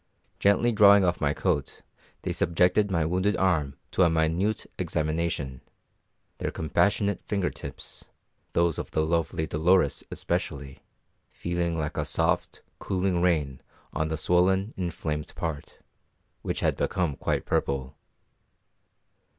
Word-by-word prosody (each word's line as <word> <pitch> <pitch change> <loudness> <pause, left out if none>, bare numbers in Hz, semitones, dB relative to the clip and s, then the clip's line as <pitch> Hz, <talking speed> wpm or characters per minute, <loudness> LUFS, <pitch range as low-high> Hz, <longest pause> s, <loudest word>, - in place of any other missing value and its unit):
Gently 100 +4 +3
drawing 100 -2 +7
off 90 -1 0
my 70 -1 +2
coat, 75 -3 -2 0.4
they - - -1
subjected 90 +5 +2
my 85 -4 +1
wounded 95 +5 +1
arm 80 -7 +1 0.2
to - - +1
a 90 - +6
minute 80 +6 0
examination; 75 -4 -2 0.8
their - - -1
compassionate 100 +5 +1
finger 100 -4 -1
tips - - -8 0.5
those 85 -2 +2
of - - -5
the 80 - 0
lovely 80 -1 0
Dolores 80 -1 +2
especially 70 -1 -3 0.5
feeling 85 -1 -2
like 75 -2 -3
a - - 0
soft, - - 0 0.2
cooling 90 -2 0
rain 75 -7 +1 0.3
on 80 - 0
the 80 0 -2
swollen, 95 +6 +2
inflamed 80 -4 -4
part, 80 -3 -5 0.6
which - - -3
had - - +1
become 85 -6 0
quite - - -1
purple. 70 0 -1
85 Hz, 125 wpm, -27 LUFS, 75-95 Hz, 0.8 s, drawing